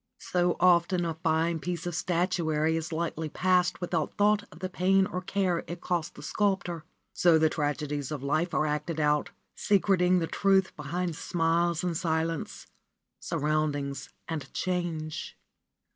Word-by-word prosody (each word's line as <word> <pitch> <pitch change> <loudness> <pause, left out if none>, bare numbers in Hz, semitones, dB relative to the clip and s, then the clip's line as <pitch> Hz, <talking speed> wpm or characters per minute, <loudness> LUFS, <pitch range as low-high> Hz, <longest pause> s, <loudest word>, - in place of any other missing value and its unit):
So 175 -1 +2
often 175 0 +4
a 165 - -1
fine 160 0 0
piece 175 +1 -4
of 175 - -3
statuary 165 -3 0
is 165 +1 -3
lightly 160 -1 -2
passed 180 +2 +2
without 170 -4 -2
thought 210 +1 +3
of 150 - -13
the 185 +2 -3
pain 190 +1 +3
or 185 -2 -4
care 185 -2 0
it 175 0 -6
cost 175 -3 -2
the - - -10
sculptor. 190 -5 -1 0.3
So 170 -2 +5
the 160 0 +3
tragedies 145 -2 -2
of 150 -3 -5
life 155 +5 0
are 155 - +2
acted 155 +2 -2
out, 150 -1 +2 0.3
secreting 185 -3 +3
the 170 - +1
truth 190 +2 +2
beneath 165 +3 -3
smiles 170 0 +1
and 175 -2 -1
silence, 160 -1 -2 0.5
surroundings 145 -2 -1 0.2
and 150 -5 -5
change. 170 -4 -3
170 Hz, 145 wpm, -28 LUFS, 155-180 Hz, 0.5 s, So